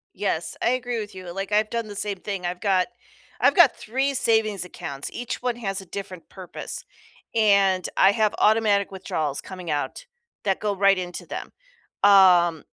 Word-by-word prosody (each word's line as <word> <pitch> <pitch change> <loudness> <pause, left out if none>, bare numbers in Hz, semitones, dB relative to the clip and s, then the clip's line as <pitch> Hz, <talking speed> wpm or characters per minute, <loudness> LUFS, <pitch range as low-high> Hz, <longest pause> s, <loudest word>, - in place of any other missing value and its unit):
Yes, - - -2
I - - +3
agree 245 -1 -1
with 210 -1 -8
you, 185 -1 -9
like, 195 +2 -5
I've 215 +1 +2
done 230 -1 -3
the 205 - -8
same 200 0 -3
thing, 195 -2 -5
I've 175 0 -4
got 190 -3 +2 0.5
I've - - +4
got - - +6
3 265 +5 -1
savings 220 -6 +1
accounts, 160 -6 -6
each 245 0 -5
one 245 -1 -1
has 195 -4 -3
a - - -13
different 190 -1 -8
purpose, 185 -2 -8 0.5
and 200 -4 +3
I 195 - +6
have 215 0 +1
automatic 210 -2 +3
withdrawals 155 -6 -3
coming 185 -3 -9
out 150 - -3 0.4
that 195 -2 0
go 210 -1 0
right 195 0 +4
into 180 -1 -5
them, - - -6 0.6
um, 180 -5 +6
200 Hz, 175 wpm, -24 LUFS, 185-215 Hz, 0.6 s, got